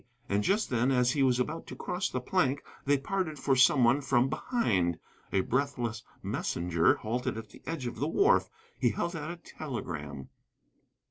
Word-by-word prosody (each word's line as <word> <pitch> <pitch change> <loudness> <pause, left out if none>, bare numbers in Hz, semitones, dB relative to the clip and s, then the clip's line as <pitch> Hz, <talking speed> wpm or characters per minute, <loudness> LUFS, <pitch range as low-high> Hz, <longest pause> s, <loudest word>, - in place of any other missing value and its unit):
And 100 -1 +1
just 205 - +1
then, 125 +1 +2
as 125 -1 +3
he 140 - 0
was 130 -2 +3
about 155 +6 -2
to - - -7
cross 180 +2 -2
the 125 - -2
plank, 140 0 +1 0.2
they 145 +1 +4
parted 160 +1 -2
for 135 0 +2
some 130 +1 +5
one 120 +5 +4
from 135 -2 +2
behind. 95 - 0 0.3
A 95 - +3
breathless 120 -2 -1 0.2
messenger 85 -1 +1
halted 115 +1 -2
at 110 -2 -7
the - - -15
edge 165 -6 -3
of 120 - -4
the 145 - -1
wharf. 400 - +3 0.3
He - - +3
held 170 +1 -2
out 155 -1 -4
a 170 - -4
telegram. 80 - -6
130 Hz, 180 wpm, -30 LUFS, 115-155 Hz, 0.3 s, some